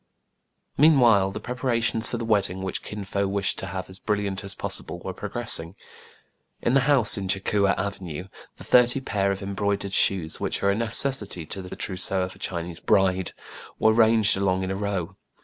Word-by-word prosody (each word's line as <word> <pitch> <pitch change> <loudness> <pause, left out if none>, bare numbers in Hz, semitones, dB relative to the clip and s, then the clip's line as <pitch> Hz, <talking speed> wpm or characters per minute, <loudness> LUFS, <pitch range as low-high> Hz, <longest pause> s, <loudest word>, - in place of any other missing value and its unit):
Meanwhile 120 -10 +5
the 95 - -6
preparations 120 -2 -1
for 120 - -3
the 115 - -4
wedding, 95 -4 0
which 95 - -3
Kin 105 -1 -7
Fo 100 +1 -2
wished 100 0 0
to 95 - -5
have 95 0 -5
as 95 +1 -9
brilliant 100 -1 -2
as 100 -1 -2
pos - - -4
sible, 90 - -9
were 95 - -4
progressing. 100 -4 -2 0.8
In 120 - 0
the 135 - +5
house 125 -8 +5
in 95 - -4
Cha 95 +1 +3
Coua 100 -1 +1
Avenue 95 -3 -5 0.3
the - - -11
thirty 125 +1 +4
pair 100 -6 -1
of 100 0 -5
embroidered 100 0 -2
shoes, 90 -6 +2
which - - -2
are 100 - +3
a - - 0
necessity 115 - +2
to 95 - -6
the 90 - -8
trousseau 95 0 -1
of 90 - -6
a - - -19
Chinese 85 -1 -5
bride, 95 -2 +1 0.4
were 110 - +3
ranged 110 -2 +4
along 95 -1 0
in 95 - -3
a - - -2
row. 100 -4 -3
100 Hz, 190 wpm, -24 LUFS, 95-110 Hz, 0.8 s, Meanwhile